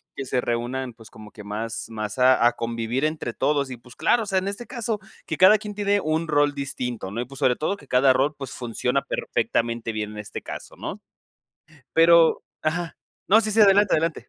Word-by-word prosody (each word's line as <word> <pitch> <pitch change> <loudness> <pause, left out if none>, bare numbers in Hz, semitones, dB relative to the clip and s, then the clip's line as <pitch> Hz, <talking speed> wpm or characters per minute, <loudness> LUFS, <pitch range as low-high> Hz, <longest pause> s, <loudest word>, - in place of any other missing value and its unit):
que 135 - -5
se 125 0 0
reúnan, 120 +2 -3
pues, 110 -1 -15
como 105 -1 -13
que 105 - -11
más 110 +3 -5
más 110 -1 -5
a 125 -1 +5
a 120 - +2
convivir 115 +3 -3
entre 155 -6 -3
todos. 140 +1 0
Y, 125 - -6
pues, 120 +1 -16
claro, 235 -2 +2
o - - -6
sea, 190 -2 +2
en 185 - -5
este 200 +4 -6
caso 230 -4 -3 0.3
que 155 - -4
cada 185 +6 +7
quien 210 -1 -7
tiene 205 0 +1
un 160 +1 -1
rol 145 -1 +2
distinto, 125 -7 -4
¿no? 110 - -4
Y, - - -4
pues, 135 +2 -11
sobre 130 -3 +3
todo, 155 +6 -1
que 145 - -17
cada 130 +1 +4
rol 135 +4 +1
pues 135 -2 -7
funciona 125 +2 -1
perfectamente 115 0 -1
bien 105 -1 -3
en 105 - -8
este 105 - -7
caso, - - -8
¿no? - - -6 0.9
Pero 165 0 +5 0.2
ajá. 165 +2 -2 0.3
No, 215 +4 +7
sí, 215 -1 -2
sí, 220 +1 +2
adelante, 205 0 +6
adelante. 165 +1 -1
135 Hz, 215 wpm, -24 LUFS, 120-170 Hz, 0.9 s, cada